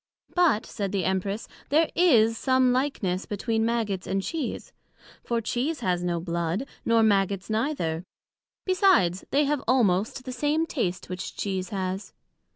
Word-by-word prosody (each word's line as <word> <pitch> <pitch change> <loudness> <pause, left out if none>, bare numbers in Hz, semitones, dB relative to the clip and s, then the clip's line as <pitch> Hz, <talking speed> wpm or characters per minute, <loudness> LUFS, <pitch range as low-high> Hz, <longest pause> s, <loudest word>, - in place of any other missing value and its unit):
But 340 -12 +3
said 200 -4 -4
the 195 -3 -1
Empress, 195 +3 -1 0.2
there 315 +3 +3
is 230 -11 +4
some 260 +1 +3
likeness 225 -9 -1
between 220 +2 -1
Maggots 215 -5 -1
and 195 0 -1
Cheese; 310 -1 -4 0.5
for 235 -1 -1
Cheese 260 +8 -2
has 180 -1 0
no 175 -1 0
blood, 170 +6 -2 0.2
nor 230 -1 +3
Maggots 195 -1 +1
neither; 215 - -1 0.6
besides, 300 - +3
they 290 +1 +3
have 290 -1 0
almost 225 0 +2
the 255 - -4
same 295 +5 +1
taste 185 - -2
which 185 +1 -6
Cheese 190 -2 -3
has. 190 0 -4
220 Hz, 145 wpm, -26 LUFS, 185-260 Hz, 0.6 s, is